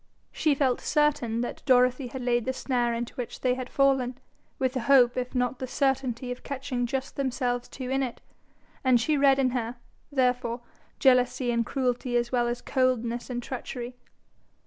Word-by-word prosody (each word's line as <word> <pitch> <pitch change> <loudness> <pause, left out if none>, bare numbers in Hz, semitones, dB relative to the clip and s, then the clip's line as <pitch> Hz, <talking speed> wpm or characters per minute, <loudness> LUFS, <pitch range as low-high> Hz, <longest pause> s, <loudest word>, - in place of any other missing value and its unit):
She 305 -3 +2
felt 265 -3 +1
certain 265 -7 +1
that 245 - -4
Dorothy 250 0 +4
had 255 +1 -6
laid 240 -1 +1
the 260 - -1
snare 245 -3 0
into 235 0 -3
which 245 -2 -6
they 250 -1 +2
had 255 0 -5
fallen, 265 -3 +2 0.4
with 260 -3 0
the 260 - -1
hope 245 -1 +5
if 250 +1 -3
not 250 0 0
the 260 - -4
certainty 260 -2 0
of 250 - -6
catching 265 -3 -3
just 265 +2 -4
themselves 250 -2 -1
two 260 -1 -6
in 270 0 +1
it, 250 -3 -3 0.6
and 255 -2 +5
she 300 +7 +1
read 275 -1 +5
in 260 -2 +2
her, 240 -1 -2 0.4
therefore, 250 -3 +1 0.4
jealousy 250 -1 +3
and 235 0 0
cruelty 250 -2 0
as 240 0 -1
well 240 -2 +2
as 240 0 -3
coldness 245 -3 0
and 245 -1 -3
treachery. 250 -1 -6
250 Hz, 175 wpm, -27 LUFS, 240-265 Hz, 0.6 s, hope